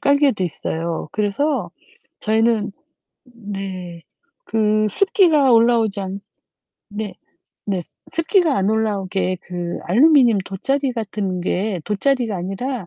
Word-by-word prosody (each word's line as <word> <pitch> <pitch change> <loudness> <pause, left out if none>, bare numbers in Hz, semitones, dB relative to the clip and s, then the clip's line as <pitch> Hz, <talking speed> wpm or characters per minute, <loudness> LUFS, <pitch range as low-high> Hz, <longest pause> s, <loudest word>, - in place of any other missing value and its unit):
깔개도 280 -8 +3
있어요. 165 -1 -3
그래서 215 +9 0 0.5
저희는 220 -1 +1 0.5
네. 195 -7 -7 0.4
그 215 - +1
습기가 320 - +4
올라오지 225 -3 +3
않 195 +1 -5 0.7
네. 205 -1 -5 0.5
네. 190 -3 -1
스 - - -30 0.2
습기가 330 -3 +2
안 195 +2 +1
올라오게 195 -4 0
그 175 -1 -5
알루미늄 245 - +5
돗자리 270 +8 -1
같은 205 -5 -3
게 190 +1 -1
돗자리가 235 +1 0
아니라 195 +4 -4
215 Hz, 240 characters per minute, -20 LUFS, 190-255 Hz, 0.7 s, 알루미늄